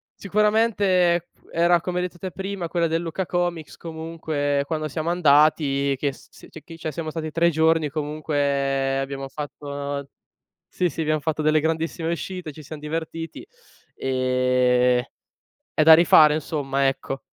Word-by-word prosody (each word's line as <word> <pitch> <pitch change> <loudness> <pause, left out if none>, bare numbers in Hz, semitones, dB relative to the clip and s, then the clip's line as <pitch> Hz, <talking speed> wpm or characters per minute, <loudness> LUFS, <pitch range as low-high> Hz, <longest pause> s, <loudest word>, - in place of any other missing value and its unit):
sicuramente 200 -4 +2 0.2
era 170 +1 +3
come 180 0 -2
hai 180 - 0
detto 175 - -18
te 185 +1 -5
prima, 195 -1 -4
quella 170 -1 +1
del 165 +1 -1
Lucca 170 +3 -3
Comics 175 -3 -2
comunque 160 -3 -2
quando 155 +1 -2
siamo 160 +3 -3
andati 145 -4 +3
che 140 +1 -1
s - - -17
s - - -15
c'è 160 - -12
chi 165 - -11
cioè 160 -1 -4
siamo 160 0 -5
stati 155 -1 -4
3 170 +2 +3
giorni 160 -1 +2
comunque 140 -2 -1
abbiamo 135 0 -4
fatto 145 +1 -8
nol 140 0 -4 0.6
sì, 180 -1 0
sì 160 - -5
abbiam 155 0 +1
fatto 155 +1 -1
delle 155 0 +4
grandissime 160 +1 -1
uscite, 180 -1 -5
ci 155 - -11
siam 150 +2 -8
divertiti; 165 +2 -5 0.5
ehm, 125 -1 +2 0.7
è 155 - +3
da 160 +1 +9
rifare 155 -2 +6
insomma, 140 -3 -1
ecco. 135 0 -3
155 Hz, 155 wpm, -23 LUFS, 140-170 Hz, 0.7 s, da